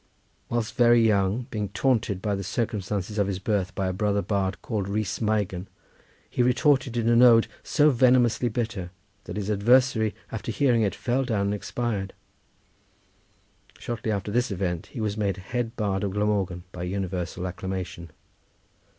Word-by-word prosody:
Whilst 120 -2 -1
very 120 -2 +5
young, 105 +1 +2
being 105 -2 -2
taunted 110 -2 0
with 105 -1 +1
the - - -4
circumstances 105 -1 -2
of 100 - +2
his 100 -2 -2
birth 100 -1 -1
by 95 - -1
a 95 - -1
brother 100 +1 0
bard 100 -2 -1
called 105 -5 -2
Rhys 105 0 -2
Meigan, 105 -4 -1 0.6
he - - -1
retorted 125 0 +2
in 115 -1 0
an 120 +1 +5
ode 115 -2 +7 0.2
so 150 -1 +3
venomously 125 -2 +3
bitter 110 -6 -3 0.4
that - - -6
his 105 0 -2
adversary, 110 +1 +3 0.2
after 110 +1 -4
hearing 120 0 +2
it, 100 -3 0
fell 130 +2 0
down 110 -6 -1
and 100 +1 0
expired. 105 -2 -3 1.6
Shortly 115 -2 -3
after 100 0 -2
this 120 +3 +1
event 90 -4 -2
he 125 - -8
was 105 -1 -2
made 100 -3 0
head 115 +4 -3
bard 100 -2 -1
of 100 -2 -2
Glamorgan 100 -4 0
by 90 - -8
universal 90 -1 -3
acclamation. 90 -2 -5
105 Hz, 160 wpm, -26 LUFS, 95-120 Hz, 1.6 s, ode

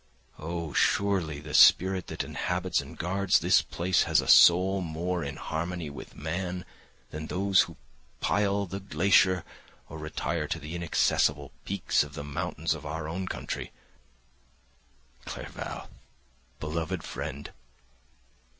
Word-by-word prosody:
Oh, 85 -1 -4
surely 90 -8 +1
the 75 0 -9
spirit 95 +4 +6
that - - -3
inhabits 90 -2 -1
and 70 +4 -12
guards 95 +2 +2
this - - +4
place 90 +1 0
has - - +5
a - - -2
soul 95 +3 +6
more 85 +1 -2
in 70 -1 -5
harmony 85 -1 -4
with 70 - -10
man 90 +3 -4 0.5
than 80 +1 -6
those 95 +1 +3
who - - -4 0.4
pile 100 -1 +1
the 95 +1 -6
glacier 95 -1 +3 0.4
or 80 - -8
retire 75 0 -3
to - - -2
the 75 +3 -8
inaccessible 75 -4 +1
peaks - - +1
of 75 0 -5
the 70 - -5
mountains 75 +2 -2
of - - -8
our 75 +1 -4
own 90 +4 -4
country." - - -5 1.5
Clerval! - - -7 0.7
Beloved 80 +2 -3
friend! 70 +2 -6
85 Hz, 130 wpm, -28 LUFS, 75-95 Hz, 1.5 s, spirit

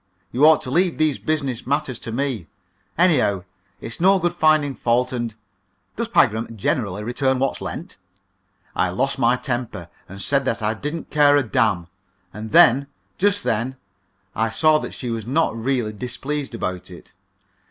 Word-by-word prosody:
You 140 +5 +5
ought 160 - +5
to 125 - -6
leave 175 +3 +2
these 155 -3 +1
business 140 -7 -2
matters 140 -3 -1
to 115 - -7
me. 120 - -2 0.5
Anyhow, 130 - +3 0.4
it's 115 +9 -6
no 195 +2 +5
good 175 -1 0
finding 155 -4 +3
fault, 125 +2 0
and 120 -3 -3 0.3
" 95 - -46
"Does 230 +1 -2
Pagram 115 - +1
generally 105 -1 -1
return 130 +3 0
what's 135 +1 -1
lent?" - - -6 0.8
I 90 - +1
lost 135 +9 -1
my 120 0 +4
temper 120 - -4 0.2
and 95 +1 -9
said 140 +6 +1
that 115 -3 -1
I 105 +1 +1
didn't 150 +8 -6
care 145 -1 +5
a 145 - +2
damn! 110 -7 +1 0.5
And 110 +1 -7
then 135 +6 +6 0.3
just 205 +1 +2
then 115 +4 -1 0.6
I 110 +1 +1
saw 155 +7 +3
that - - -7
she 125 -2 -4
was 115 -1 -4
not 145 -2 +1
really 115 -2 -1
displeased 130 +4 -4
about 90 -5 -4
it. 90 - -13
125 Hz, 165 wpm, -22 LUFS, 110-150 Hz, 0.8 s, then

